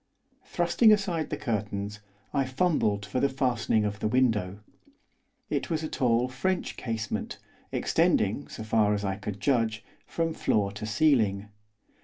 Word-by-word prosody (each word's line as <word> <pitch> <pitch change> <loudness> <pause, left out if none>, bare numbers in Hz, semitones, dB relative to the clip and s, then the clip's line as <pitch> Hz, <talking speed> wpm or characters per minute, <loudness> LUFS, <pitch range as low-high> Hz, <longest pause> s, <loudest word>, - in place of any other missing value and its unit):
Thrusting 175 +6 +3
aside 190 -7 +1
the 150 - -3
curtains, 105 -3 -3 0.3
I 140 -2 +2
fumbled 130 - +1
for 100 +5 -2
the 140 - +2
fastening 120 -5 +1
of 105 0 -3
the - - 0
window. 105 -6 +1 0.9
It - - -2
was 160 -2 -1
a - - -1
tall 125 -3 +1
French 175 +9 -2
casement, 110 -3 -4 0.3
extending, - - +1
so - - -8
far 110 -1 +2
as 100 0 -3
I 95 -1 -1
could 105 -1 -6
judge, 110 -2 0 0.2
from 165 -1 -1
floor 100 -8 +1
to 105 +2 -6
ceiling. 105 -5 +2
115 Hz, 145 wpm, -28 LUFS, 105-140 Hz, 0.9 s, Thrusting